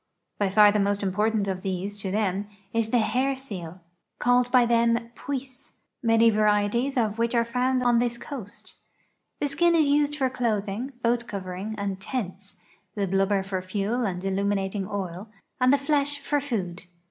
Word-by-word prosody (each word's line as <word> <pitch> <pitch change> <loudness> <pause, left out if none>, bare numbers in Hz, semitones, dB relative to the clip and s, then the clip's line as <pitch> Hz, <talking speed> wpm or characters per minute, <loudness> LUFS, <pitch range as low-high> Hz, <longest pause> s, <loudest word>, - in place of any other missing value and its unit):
Wy 200 -2 +2
far 205 +1 +6
tlie 210 0 +1
most 200 +1 0
important 210 +2 +1
of 185 -1 -2
these, 195 +1 -3
to 195 - -3
them, 200 0 -1 0.3
is 225 -1 +1
the 245 - +3
hair 260 +4 +1
seal, 185 -10 -7 0.4
called 245 0 +3
h}' 245 -1 +4
them 235 0 +3
" - - -36
puisse," 270 +1 -6 0.3
man}' 225 -1 +4
varieties 215 +5 +1
of 220 -2 0
which 235 +1 +1
are 235 0 +3
found 250 +2 0
on 240 -1 +4
this 240 0 0
coast. 235 -7 -9 0.7
The 290 - 0
skin 340 +5 +3
is 315 -3 +4
used 290 +1 +2
for 270 -3 +1
clothing, 235 0 -2
lioat 235 0 +1
covering, 195 +2 -5
and 200 -2 -3
tents, 200 -3 -5 0.4
the 205 -2 0
liluhhcr 195 +1 +1
for 190 -1 -2
fuel 205 +6 -1
and 185 -3 -3
illuminating 195 0 -1
oil, 195 0 -5 0.3
and 255 0 +4
the 285 - +5
flesh 285 0 +1
for 285 0 -1
food. 190 -10 -4
220 Hz, 170 wpm, -26 LUFS, 195-250 Hz, 0.7 s, far